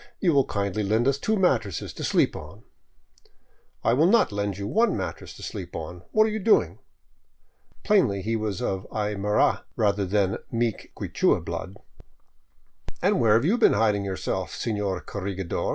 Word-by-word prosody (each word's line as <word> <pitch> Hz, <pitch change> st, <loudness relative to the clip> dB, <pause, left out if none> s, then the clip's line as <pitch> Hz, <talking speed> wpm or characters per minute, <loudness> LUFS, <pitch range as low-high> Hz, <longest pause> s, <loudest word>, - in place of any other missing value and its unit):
You 175 Hz, -4 st, +2 dB
will 140 Hz, -2 st, +4 dB
kindly 100 Hz, 0 st, -2 dB
lend 110 Hz, +5 st, +1 dB
us 140 Hz, 0 st, +1 dB
two 220 Hz, +8 st, 0 dB
mattresses 120 Hz, -, 0 dB
to -, -, -7 dB
sleep -, -, +2 dB
on.'* -, -, -10 dB, 0.6 s
" -, -, -35 dB, 0.3 s
I 115 Hz, -, +3 dB
will 150 Hz, +7 st, +4 dB
not 220 Hz, -, +4 dB
lend 100 Hz, -1 st, -2 dB
you 100 Hz, -, -4 dB
one 225 Hz, -, +2 dB
mattress 90 Hz, -4 st, -6 dB
to -, -, -11 dB
sleep 90 Hz, -2 st, -6 dB
on. 85 Hz, +2 st, -6 dB
What 215 Hz, -, +5 dB
are 220 Hz, -, -1 dB
you 220 Hz, -, -2 dB
doing?" 215 Hz, +2 st, +2 dB, 1.0 s
Plainly 125 Hz, -, +2 dB
he 115 Hz, +1 st, -1 dB
was 105 Hz, -4 st, -3 dB
of 95 Hz, 0 st, -2 dB
Aymara 105 Hz, -1 st, +1 dB
rather 100 Hz, -2 st, +1 dB
than 95 Hz, 0 st, +1 dB
meek 115 Hz, -2 st, -2 dB
Quichua -, -, 0 dB
blood. -, -, -5 dB, 0.6 s
" -, -, -19 dB
And -, -, +3 dB
where 110 Hz, -2 st, +5 dB
have 115 Hz, +5 st, +2 dB
you 220 Hz, +8 st, +2 dB
been -, -, +5 dB
hiding 105 Hz, -1 st, +2 dB
yourself, 95 Hz, -4 st, -3 dB
senor 105 Hz, -5 st, -2 dB
corregidor? 95 Hz, -2 st, -4 dB
105 Hz, 170 wpm, -25 LUFS, 100-125 Hz, 1.0 s, What